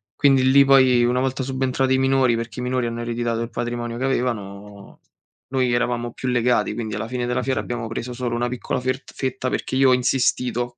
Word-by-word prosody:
Quindi 135 -2 +4
lì 140 +1 +6
poi, 130 -3 +5
una 125 +1 +1
volta 130 0 -1
subentrati 130 0 0
i - - +3
minori, 135 -2 +3
perché 115 +2 -5
i - - -4
minori 125 -1 -1
hanno 115 0 -4
ereditato 115 -1 -2
il 115 0 -5
patrimonio 120 0 -4
che 130 - -1
avevano, 105 -6 -4 0.5
noi 130 -2 +1
eravamo 120 0 -1
più 130 - -4
legati, 125 0 +1
quindi 110 -3 -4
alla 105 +2 -4
fine 125 0 -3
della 125 - -1
fiera 130 0 -1
abbiamo 120 -1 -4
preso 115 +2 -5
solo 120 -1 -3
una 120 +1 0
piccola 125 0 -3
fert 130 +1 -4
fetta 130 -1 -3
perché - - -3
io 135 0 +5
ho 130 - +5
insistito, 125 -1 0
125 Hz, 205 wpm, -22 LUFS, 120-130 Hz, 0.5 s, lì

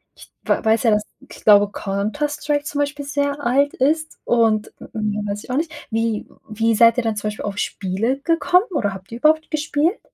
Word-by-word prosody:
ich - - -16
wa - - 0
weiß 220 +2 +3
ja, 230 - +4
dass 210 0 +2 0.3
ich - - -13
glaube, 205 -1 +6
„Counter-Strike“ 290 +9 -2
zum 290 0 -4
Beispiel 285 0 -2
sehr 285 0 -1
alt 280 +4 +2
ist 310 +4 0
und 225 -3 +2 0.2
mehr 210 -1 -2
weiß 205 +1 -4
ich - - -8
auch 255 - 0
nicht. 315 0 -1 0.2
Wie 225 -1 -1 0.2
wie 225 +1 +1
seid 230 +2 +5
ihr 250 - +1
dann 225 -1 -1
zum 210 0 -3
Beispiel 210 0 -5
auf 205 0 -4
Spiele 210 +8 -1
gekommen 345 +4 +3
oder 205 - -1
habt 190 +3 -13
ihr 235 - -6
überhaupt 315 +2 +2
gespielt? 310 +4 0
235 Hz, 200 wpm, -21 LUFS, 210-290 Hz, 0.3 s, glaube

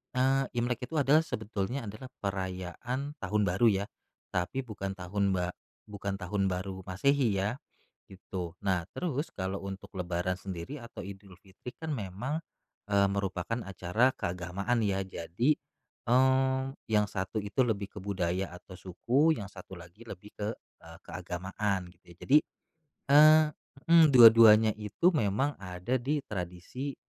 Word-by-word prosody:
eee, 135 +1 +3
Imlek 120 +1 -1
itu 160 - -7
adalah 145 +2 +5
sebetulnya 110 +1 -3
adalah 110 +6 -8 0.2
perayaan 95 +8 -4
tahun 105 +1 0
baru 100 +6 +3 0.2
ya, - - -6 0.5
tapi 90 +10 -1
bukan 100 -5 -5
tahun 95 +1 -1
ba 90 -1 -1 0.4
bukan 100 -1 -4
tahun 100 +1 -1
baru 95 +1 -3
Masehi 120 +3 +2
ya, 105 +8 -1 0.5
gitu. 90 -2 -7
Nah 95 -3 +1
terus, 155 -3 -3
kalau 95 +1 -4
untuk 100 +1 -8
lebaran 90 0 -1
sendiri 95 - -6
atau 115 - -9
Idul 95 -2 -11
Fitri 100 +5 -11
kan 160 -1 -5
memang, 125 - -4 0.5
eee, 100 0 +4
merupakan 100 +3 -2
acara 95 +6 +1
keagamaan 90 +7 -2
ya, 100 -2 +1
jadi, 95 - -1 0.6
eee, 130 +1 +4 0.3
yang 105 -1 +3
1 95 +3 -3
itu 105 +6 +1
lebih 100 -4 -2
ke 105 - -6
budaya 95 -1 -1
atau 95 - -14
suku, 130 - +1
yang 100 - -5
1 95 -1 -11
lagi 85 +6 -14
lebih 105 0 -10
ke, 105 +1 -3 0.3
eee, - - -12
keagamaan. 95 +2 -3 0.2
Ya, - - -19
jadi, 150 +3 +4 0.7
eee, 155 +2 +8 0.5
mmm, 160 -4 +7
dua-duanya 115 -2 +9
itu 105 - +2
memang 135 +2 0
ada 95 +7 -2
di 145 +4 -1
tradisi, 95 +9 -5
100 Hz, 140 wpm, -30 LUFS, 95-125 Hz, 0.7 s, dua-duanya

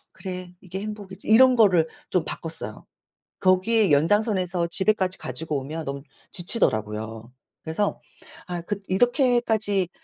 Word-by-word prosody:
'그래 185 -2 -7
이게 190 +1 -7
행복이지.' 205 -2 -8
이런 255 +4 +6
거를 190 -9 +4 0.2
좀 180 -3 +1
바꿨어요. 160 -10 -7 0.6
거기에 190 +2 +3
연장선에서 180 +2 +1
집에까지 190 -1 +2
가지고 150 +3 -3
오면 155 +4 -6
너무 140 0 -5 0.3
지치더라고요. 110 - 0 0.3
그래서 165 +6 -2 0.5
아 175 -1 -4
그 200 +4 -4
이렇게까지 220 - +2
185 Hz, 310 characters per minute, -24 LUFS, 160-210 Hz, 0.6 s, 이런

